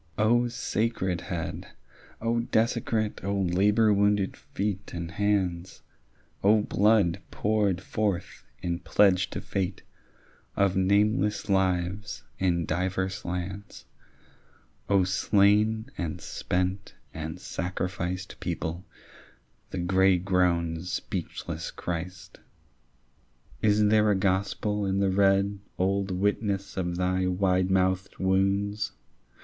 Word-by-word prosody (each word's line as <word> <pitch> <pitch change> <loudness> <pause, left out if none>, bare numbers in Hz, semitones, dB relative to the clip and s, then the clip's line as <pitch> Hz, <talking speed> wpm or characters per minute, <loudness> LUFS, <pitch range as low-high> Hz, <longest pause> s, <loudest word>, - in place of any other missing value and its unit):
O 120 +3 +3
sacred 110 -5 -1
head, 85 -3 -5 0.5
O 115 +1 0
desecrate, 110 -2 0
O 100 +1 -1
labour 105 +4 +3
wounded 100 -1 +2
feet 100 -1 -4
and 85 -1 -5
hands, 95 -2 -1 0.6
O 105 +1 +5
blood 100 -4 +3
poured 100 -3 0
forth 100 -3 -2 0.2
in 85 -1 -1
pledge 95 +1 +3
to - - -4
fate 95 -1 -3 0.7
Of 100 -1 +2
nameless 105 +2 +2
lives 95 0 0 0.2
in 85 -3 +1
divers 95 +4 -2
lands, 90 +3 -5 1.0
O 100 -2 +4
slain 105 +3 +2
and 85 -3 -3
spent 95 +2 -2 0.2
and 80 +2 -5
sacrificed 90 0 -4
People, 85 +3 -3 0.9
the - - -5
grey 95 +1 +3
grown 85 -3 +1
speechless 90 -1 -4
Christ! 90 +1 -6 1.2
Is 105 0 +4
there 105 0 +4
a 105 - +3
gospel 100 +2 0
in 95 -1 0
the 100 -1 +2
red 100 +1 +3 0.2
Old 95 +1 0
witness 100 +1 -1
of 90 -2 -2
thy 90 0 +1
wide 90 0 +1
mouthed 95 0 +1
wounds? 100 +2 +1
95 Hz, 105 wpm, -27 LUFS, 90-105 Hz, 1.2 s, O